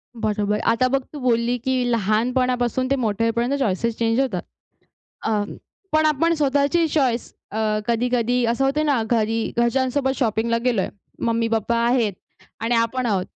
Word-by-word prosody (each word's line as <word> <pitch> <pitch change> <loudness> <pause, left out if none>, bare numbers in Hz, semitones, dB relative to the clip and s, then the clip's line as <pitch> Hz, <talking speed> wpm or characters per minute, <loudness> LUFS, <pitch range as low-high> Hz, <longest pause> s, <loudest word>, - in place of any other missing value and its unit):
बरोबर. 210 -2 -1
आता 230 +3 +2
बघ 270 +1 +1
तू 295 - -6
बोलली 240 -1 +1
की 260 -1 +1
लहानपणापासून 245 +3 +1
ते - - +4
मोठे 230 -4 -1
होईपर्यंत 235 +3 0
चॉइसेस 230 -1 0
चेंज 230 +1 +1
होतात. 235 -10 0 0.8
अ, 215 -2 +1 0.5
पण 310 0 +3
आपण 310 +2 +2
स्वतःची 285 +3 +2
चॉईस 260 -6 0 0.2
अ, 215 -1 0
कधी-कधी 245 +1 +1
असं 235 +3 +1
होतं 295 +3 +1
ना 280 -6 +2
घरी 225 -1 +1
घरच्यांसोबत 260 +3 +1
शॉपिंगला 230 -1 +1
गेलोय. 230 -6 +1 0.4
मम्मी-पप्पा 230 0 0
आहेत 235 -4 +2 0.5
आणि 230 +2 0
आपण 230 +2 0
आहोत. 195 -5 0
235 Hz, 145 wpm, -22 LUFS, 225-260 Hz, 0.8 s, ते